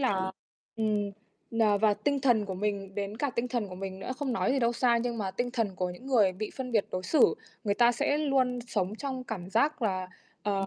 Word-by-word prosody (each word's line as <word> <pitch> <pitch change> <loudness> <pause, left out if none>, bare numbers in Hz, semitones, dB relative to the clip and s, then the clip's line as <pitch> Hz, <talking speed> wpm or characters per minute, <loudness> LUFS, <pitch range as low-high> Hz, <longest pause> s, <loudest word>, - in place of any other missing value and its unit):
là 190 -7 +1 0.4
ừm, 210 -2 0 0.5
ờ, 210 -2 +4
và 215 0 +4
tinh 285 +5 0
thần 240 -5 +3
của 195 -2 -4
mình, 195 0 -2
đến 205 +1 -3
cả 280 +2 0
tinh 235 +1 0
thần 235 -5 -1
của 185 - -7
mình 190 0 -5
nữa, 195 - -6
không 280 -2 -2
nói 240 - +1
gì 275 - +2
đâu 235 -1 +2
xa, 240 0 +3
nhưng 240 -1 -2
mà 195 -3 -1
tinh 245 +5 -2
thần 225 -6 -1
của 180 -1 -1
những 180 +9 -10
người 220 -8 +4
bị 210 +3 -4
phân 255 -2 -4
biệt 215 -3 +3
đối 185 - -2
xử 305 - +4 0.3
người 200 -1 +2
ta 240 +2 +5
sẽ 285 +5 +1
luôn 265 -4 +2
sống 200 -3 -1
trong 260 -1 -4
cảm 190 -6 -6
giác 280 +6 +2
là, 185 -4 0 0.3
ờ, 195 -2 0
220 Hz, 235 wpm, -29 LUFS, 195-250 Hz, 0.5 s, ta